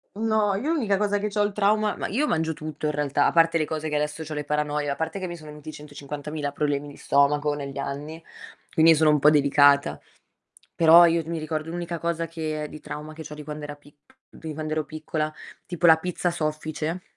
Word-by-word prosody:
No, 215 -2 +1
io 290 +11 -1
l'unica 215 -11 +1
cosa 205 0 +1
che 210 - -1
c'ho 205 0 0
il 205 - 0
trauma 210 +1 +2
ma - - -3
io 280 +9 0
mangio 160 -1 0
tutto, 155 0 -5
in - - +1
realtà, 145 -1 +1
a - - +2
parte 165 0 +4
le 155 - +1
cose 155 0 -4
che 150 - -2
adesso 150 +2 -2
c'ho 155 - -7
le 150 -1 -4
paranoie, 150 -1 -1
a 140 - -1
parte 160 +4 -3
che 185 - -4
mi 175 - -6
sono 155 -1 -11
venuti 150 +1 -9
150.000 145 0 -6
problemi 145 -1 -1
di 145 - -11
stomaco 145 +1 +2
negli 140 -1 -6
anni, 150 +4 -5 0.5
quindi 160 0 +6
sono 155 0 +4
un 150 - +3
po' 150 - +6
delicata. 145 -1 +4 0.8
Però 170 +1 +8
io 165 0 +2
mi 165 0 -3
ricordo 155 0 -4
l'unica 170 0 -4
cosa 170 0 -2
che 155 -2 -4
è 150 - -6
di 155 - -10
trauma 150 +1 -7
che 160 +1 -9
c'ho 150 -1 -9
di 150 - -9
quand'era 150 0 -7
pic 145 0 -21 0.4
di 160 -1 -7
quand'ero 155 0 -2
piccola, 155 0 -4 0.3
tipo 175 -1 0
la 160 -1 +8
pizza 175 +1 -2
soffice, 155 +1 -3
155 Hz, 215 wpm, -25 LUFS, 150-170 Hz, 0.8 s, Però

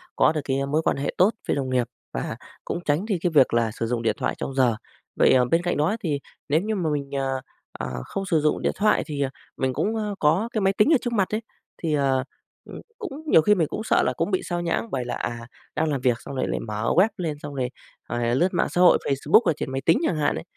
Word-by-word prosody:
có - - +4
được 155 -2 -2
cái 135 0 -1
mối 150 +3 +1
quan - - 0
hệ 140 - -2
tốt 185 +4 +6 0.2
với - - +1
đồng 135 -2 -2
nghiệp 125 -2 +1 0.3
và 60 - -3 0.3
cũng - - -3
tránh 150 +7 +1
đi 200 -5 0
cái 175 - +1
việc 130 - +5
là 115 -2 +2
sử 115 - -3
dụng 120 0 -1
điện 115 - +1
thoại - - -1
trong 135 - -4
giờ. 125 -4 +3 0.4
Vậy, - - +5
ờ, 125 -1 +5
bên 165 +7 +2
cạnh 175 - 0
đó 155 +9 +2
thì 145 -4 0 0.3
nếu 155 +4 +3
như 215 +1 -2
mà 170 -5 0
mình, 140 -2 -3
ờ, 135 -1 -1 0.3
ờ, 65 -1 -5
không 195 0 -4
sử 160 -4 +2
dụng 150 - +1
điện - - +1
thoại 215 +1 +2
thì, 145 -3 -4
à, 135 - +1 0.3
mình 130 -1 0
cũng, 220 - -1
ơ, 210 -2 -2
có 175 +10 +2
cái 215 - 0
máy 195 0 +3
tính 210 +11 +3
ở - - +6
trước 240 -1 -3
mặt 195 -4 +1
ấy, 225 - -2 0.4
thì, 160 -3 -2
ờ, 135 -2 +2 0.5
ừm, - - -8 0.2
cũng 335 - -7
nhiều 160 - +6
khi 210 +6 +4
mình 165 -5 +1
cũng 220 - -4
sợ - - +3
là - - +1
cũng 205 - -1
bị 185 - +1
xao 175 -1 -2
nhãng 175 +6 -1
bởi 125 -2 -2
là, 120 - -3
à, 120 0 -4 0.3
đang 160 0 +1
làm 135 -3 -1
việc 125 -2 +1
xong 140 - -8
rồi 130 - -1
lại - - -1
mở 105 -1 -4
web 190 +5 +6
lên 160 -5 -3
xong 145 -1 -7
rồi 125 -2 -1 0.4
rồi 120 0 0
lướt 180 +7 +3
mạng - - +1
xã 180 - 0
hội 180 - +7
Facebook 145 - +4
ở 165 - +1
trên 130 - -4
máy 135 0 -2
tính 165 - +5
chẳng 160 - 0
hạn 150 - +1
ấy. - - -5
150 Hz, 275 wpm, -24 LUFS, 130-185 Hz, 0.5 s, hội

